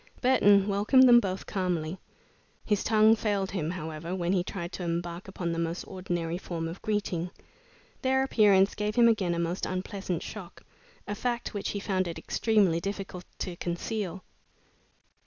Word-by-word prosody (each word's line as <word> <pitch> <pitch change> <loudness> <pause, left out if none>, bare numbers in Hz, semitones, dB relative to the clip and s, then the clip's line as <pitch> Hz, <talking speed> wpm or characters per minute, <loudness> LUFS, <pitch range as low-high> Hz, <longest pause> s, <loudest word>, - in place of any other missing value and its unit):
Burton 205 -6 +5
welcomed 210 +6 +5
them 240 -1 +8
both 190 -4 -3
calmly. 180 -3 -2 0.7
His 210 -2 +1
tongue 220 0 +5
failed 205 -3 -1
him, 165 -5 -2
however, 165 0 -5
when 175 0 0
he 180 -2 +2
tried 175 -1 -5
to 180 - -6
embark 170 +1 -3
upon 180 -3 -3
the 165 - -2
most 170 +1 -2
ordinary 175 -2 -3
form 165 -3 -4
of 165 +3 -7
greeting. 195 -5 -1 0.7
Their 265 0 +2
appearance 205 -6 +4
gave 210 0 -2
him 235 -1 +6
again 195 -7 +2
a - - -2
most 170 +2 -1
unpleasant 185 -1 -3
shock, 195 -5 -9 0.4
a 205 - -2
fact 240 +3 -2
which 205 - -3
he 200 - -3
found 190 -2 -1
it 170 - -5
extremely 205 -7 +2
difficult 195 -1 -5
to 180 - -4
conceal. 185 +1 -3
190 Hz, 160 wpm, -28 LUFS, 175-210 Hz, 0.7 s, them